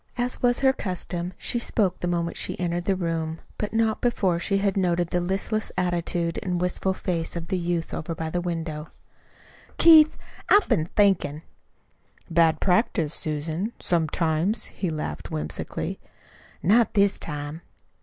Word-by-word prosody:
As 245 0 -1
was 245 0 +3
her 265 -1 +5
custom 180 -4 -3
she 240 - -1
spoke 200 -5 +1
the 175 - -2
moment 170 -1 -1
she - - -3
entered 175 0 -1
the 195 - +2
room 165 -3 -2 0.2
but 210 - -2
not 225 -1 +1
before 195 -8 +1
she 195 +3 0
had 195 -1 +1
noted 175 -3 +1
the 175 - +1
listless 195 +4 -2
attitude 175 -1 0
and 180 -2 -2
wistful 180 +1 0
face 170 -3 -2
of 170 -1 -5
the 190 - 0
youth 170 -1 -2
over 165 +1 -4
by 160 0 -4
the 175 - -1
window. 165 -3 -4 0.9
"Keith, 315 -2 +7 0.3
I've 410 -2 +6
been 155 - +2
thinkin'." 180 -7 +2 0.9
"Bad 165 -1 +4
practice, 180 -5 +2
Susan 160 +8 -1
sometimes," 165 +4 0
he 185 - -2
laughed 155 - -5
whimsically. 75 0 -4 0.6
"Not 220 +6 +3
this 200 0 +3
time." 150 +1 -5
175 Hz, 150 wpm, -25 LUFS, 165-200 Hz, 0.9 s, Keith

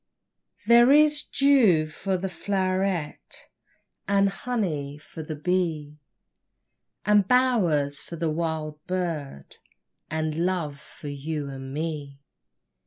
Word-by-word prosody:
There 235 +2 +7
is 300 0 +5
dew 245 - +4
for 190 +5 -3
the 190 +2 -3
flow'ret 185 -3 -2 0.6
And 200 0 +3
honey 175 - -3
for 155 +2 -10
the 155 0 -5
bee, 155 -3 -1 1.1
And 205 -1 +4
bowers 180 - +2
for 170 - -9
the 165 -1 -1
wild 155 -2 -3
bird, 165 - -4 0.5
And 155 +1 -1
love 170 -6 -1
for 150 - -12
you 145 +1 -4
and 135 0 -8
me. 145 -2 -4
165 Hz, 105 wpm, -26 LUFS, 150-195 Hz, 1.1 s, There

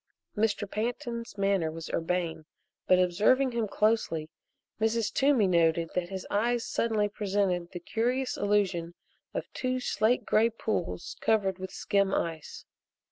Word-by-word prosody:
Mr. 210 -1 0
Pantin's 235 +2 -4
manner 195 -5 +1
was 165 0 -7
urbane 165 -2 -2 0.4
but, 185 - +6
observing 210 +9 +3
him 235 -2 -1
closely, 195 -8 0 0.5
Mrs. 220 0 +1
Toomey 270 -6 +4
noted 165 -2 +2
that 175 -1 -1
his 190 -1 -5
eyes 235 +3 +1
suddenly 220 -3 +1
presented 195 -4 -1
the 175 - -6
curious 245 +7 -1
illusion 190 -5 0 0.4
of - - -4
two 255 0 -1
slate 240 -1 +1
gray 225 +2 +4
pools 215 -6 -3
covered 195 -4 +1
with 190 0 -5
skim 195 -1 +1
ice. 165 -3 -4
205 Hz, 135 wpm, -29 LUFS, 175-230 Hz, 0.5 s, but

